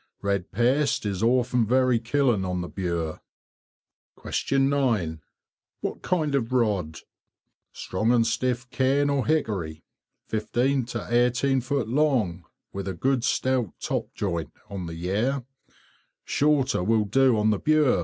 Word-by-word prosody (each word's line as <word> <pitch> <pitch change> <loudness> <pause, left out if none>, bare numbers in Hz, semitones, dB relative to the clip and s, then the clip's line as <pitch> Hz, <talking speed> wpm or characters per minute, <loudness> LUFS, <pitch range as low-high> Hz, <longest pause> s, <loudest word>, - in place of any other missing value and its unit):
Red 100 -2 -1
paste 130 +5 +1
is 100 -2 -2
often 125 +1 +2
very 125 +1 +3
killing 120 -3 +1
on 90 -1 -2
the 90 - -4
Bure. 85 -4 -3 1.3
9. 130 - +1 0.6
What - - -4
kind 160 -5 0
of 130 -3 0
rod? 105 -11 0 0.7
Strong 110 +5 -1
and 120 -2 +4
stiff 125 +1 -1
cane 140 +2 +2
or 140 -2 0
hickory, 100 - -1 0.4
15 120 +4 0
to 120 -2 -5 0.2
18 130 +2 +1
feet 135 -2 -1
long, 115 - +1 0.3
with 100 0 -5
a 95 - -3
good 130 +5 0
stout 130 -6 0
top - - -3
joint, 85 -5 -2 0.2
on 95 -3 -5
the 85 - -6
Yare. 110 +10 -1 0.8
Shorter 140 -8 +2
will 110 +2 +2
do 130 +3 +3
on 105 +1 +3
the 105 - 0
Bure. 155 -7 +3
120 Hz, 135 wpm, -25 LUFS, 100-135 Hz, 1.3 s, and